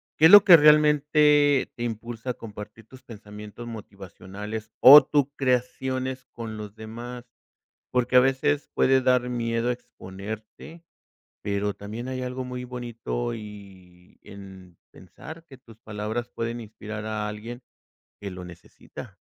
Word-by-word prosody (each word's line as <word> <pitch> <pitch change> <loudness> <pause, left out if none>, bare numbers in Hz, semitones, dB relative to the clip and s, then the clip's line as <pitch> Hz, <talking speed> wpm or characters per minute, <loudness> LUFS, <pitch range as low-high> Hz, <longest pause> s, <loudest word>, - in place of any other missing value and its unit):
¿Qué 155 - +4
es 165 - +8
lo 205 0 +10
que 180 - +9
realmente 150 -2 +4
te 120 - -6
impulsa 115 +2 -6
a - - -5
compartir 105 0 -11
tus 130 +1 -15
pensamientos 105 0 -11
motivacionales 105 0 -9
o 145 +3 +10
tus 145 -3 +1
creaciones 130 0 -2
con 115 -2 -7
los 105 0 -9
demás? 120 +3 -9 0.7
Porque 125 0 0
a 125 - +8
veces 140 +3 0
puede 130 0 +3
dar 125 -1 +2
miedo 115 0 -1
exponerte, 110 - -10 0.6
pero 100 0 -2
también 110 +5 -8
hay 130 -1 -4
algo 125 +1 -4
muy 125 0 -6
bonito 120 -1 -5
y 95 -5 -13
en 95 -3 -13 0.2
pensar 160 - -13
que 135 - -14
tus 115 -4 -18
palabras 110 +3 -5
pueden 115 +1 -4
inspirar 110 -1 -8
a 105 -1 -3
alguien 115 +4 -8 0.6
que 100 -2 -7
lo 90 0 -9
necesita. 90 -1 -13
115 Hz, 135 wpm, -25 LUFS, 105-130 Hz, 0.7 s, lo